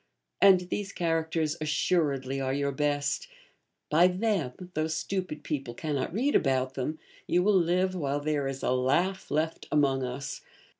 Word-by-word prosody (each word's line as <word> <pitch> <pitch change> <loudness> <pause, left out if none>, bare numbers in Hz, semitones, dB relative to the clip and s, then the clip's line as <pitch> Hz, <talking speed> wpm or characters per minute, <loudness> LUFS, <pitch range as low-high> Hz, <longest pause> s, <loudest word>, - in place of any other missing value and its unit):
And 195 -2 +7
these 205 -1 -2
characters, 165 -2 0
assuredly, 145 -4 0
are 130 0 -1
your 140 0 0
best; 145 - -1 0.6
by 170 +4 +6
them, 185 - 0 0.2
though 155 +1 0
stupid 160 0 -3
people 135 -6 -4
cannot 145 -2 -2
read 255 - +1
about 130 -2 +2
them, 140 +4 -3 0.3
you 180 - +3
will 210 +2 +4
live 185 +1 +2
while 145 -5 -1
there 145 -2 -1
is 135 0 -5
a - - +1
laugh 145 +10 +1
left 160 +2 -1
among 135 -3 +2
us. 130 +2 -5
150 Hz, 150 wpm, -28 LUFS, 135-180 Hz, 0.6 s, And